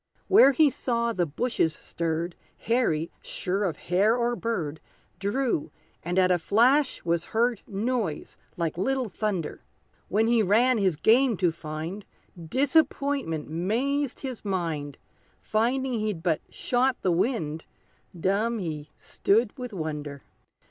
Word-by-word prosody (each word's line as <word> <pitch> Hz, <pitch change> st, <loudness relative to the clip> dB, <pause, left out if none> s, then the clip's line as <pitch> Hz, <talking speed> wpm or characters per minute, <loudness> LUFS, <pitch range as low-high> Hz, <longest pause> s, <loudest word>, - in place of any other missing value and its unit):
Where 375 Hz, -8 st, +7 dB
he 290 Hz, +1 st, +4 dB
saw 235 Hz, -2 st, -1 dB
the 175 Hz, -5 st, 0 dB
bushes 165 Hz, -, 0 dB
stirred, 170 Hz, +1 st, -3 dB, 0.2 s
Harry, 220 Hz, -10 st, 0 dB
sure 195 Hz, +3 st, -2 dB
of 165 Hz, -6 st, -2 dB
hare 200 Hz, +6 st, +2 dB
or 240 Hz, 0 st, 0 dB
bird, 170 Hz, -11 st, -3 dB, 0.4 s
Drew, 210 Hz, -, -1 dB, 0.3 s
and 175 Hz, +2 st, -3 dB
at 185 Hz, -1 st, +4 dB
a 180 Hz, -, +3 dB
flash 255 Hz, -, +3 dB
was 170 Hz, 0 st, 0 dB
heard 235 Hz, 0 st, 0 dB
Noise 215 Hz, -5 st, -2 dB, 0.2 s
like 170 Hz, -1 st, -2 dB
little 260 Hz, +3 st, 0 dB
thunder. 190 Hz, -5 st, -3 dB, 0.4 s
When 215 Hz, +3 st, +2 dB
he 230 Hz, 0 st, +3 dB
ran 225 Hz, +5 st, +3 dB
his 190 Hz, -5 st, +2 dB
game 230 Hz, -, +4 dB
to 175 Hz, -2 st, +2 dB
find, 160 Hz, +5 st, -6 dB, 0.3 s
Disappointment 265 Hz, -, 0 dB
'mazed 245 Hz, -, -1 dB
his 260 Hz, -4 st, -5 dB
mind; 165 Hz, -8 st, -3 dB, 0.4 s
Finding 250 Hz, +4 st, 0 dB
he'd 210 Hz, -6 st, -2 dB
but 165 Hz, -4 st, +1 dB
shot 250 Hz, +1 st, +1 dB
the 185 Hz, -, +2 dB
wind, 165 Hz, -, -1 dB, 0.5 s
Dumb 210 Hz, +6 st, +1 dB
he 155 Hz, -6 st, -5 dB
stood 215 Hz, +2 st, +1 dB
with 250 Hz, -2 st, -6 dB
wonder! 150 Hz, -6 st, -5 dB
205 Hz, 130 wpm, -26 LUFS, 165-245 Hz, 0.5 s, Where